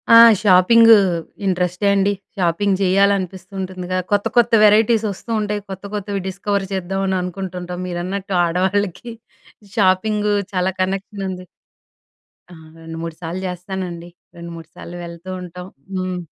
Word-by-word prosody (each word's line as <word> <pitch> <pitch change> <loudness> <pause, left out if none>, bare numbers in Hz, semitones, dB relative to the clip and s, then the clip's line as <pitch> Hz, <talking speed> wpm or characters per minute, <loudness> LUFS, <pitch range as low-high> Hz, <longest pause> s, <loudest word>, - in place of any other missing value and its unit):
ఆ! - - +11 0.2
షాపింగు 220 +4 +7 0.5
ఇంటరెస్టే 180 +1 0
అండి. 200 0 +2 0.3
షాపింగ్ 190 +3 +1
చేయాలనిపిస్తూ 190 -1 +1
ఉంటుందిగా, 185 -1 -4
కొత్త 205 0 +2
కొత్త 240 0 +5
వెరైటీస్ 220 +1 +4
వస్తూ 215 +4 -9
ఉంటాయి. 210 0 -2
కొత్త 190 +1 -7
కొత్తవి 200 -1 -3
డిస్కవర్ 200 +1 -2
చేద్దామని 190 0 -1
అనుకుంటు 185 +1 -5
ఉంటాం. 180 0 -6
మీరన్నట్టు 185 +2 -3
ఆడవాళ్ళకి 190 +5 -1 0.6
షాపింగు 210 +1 +2 0.2
చాలా 185 0 +1
కనెక్షన్ 195 +2 -3
ఉంది. 185 -1 -7 1.1
ఆ! - - -11 0.3
రెండు, 165 0 -8
మూడు 165 -1 -5
సార్లు 170 +2 -4
చేస్తానండి. 180 -1 -6 0.3
రెండు 170 0 -9
మూడు 165 -1 -10
సార్లు 175 - -9
వెళ్తూ 170 +2 -10
ఉంటాం. 180 0 -9 0.3
హ్మ్. 185 -1 -2
190 Hz, 130 wpm, -20 LUFS, 180-200 Hz, 1.1 s, ఆ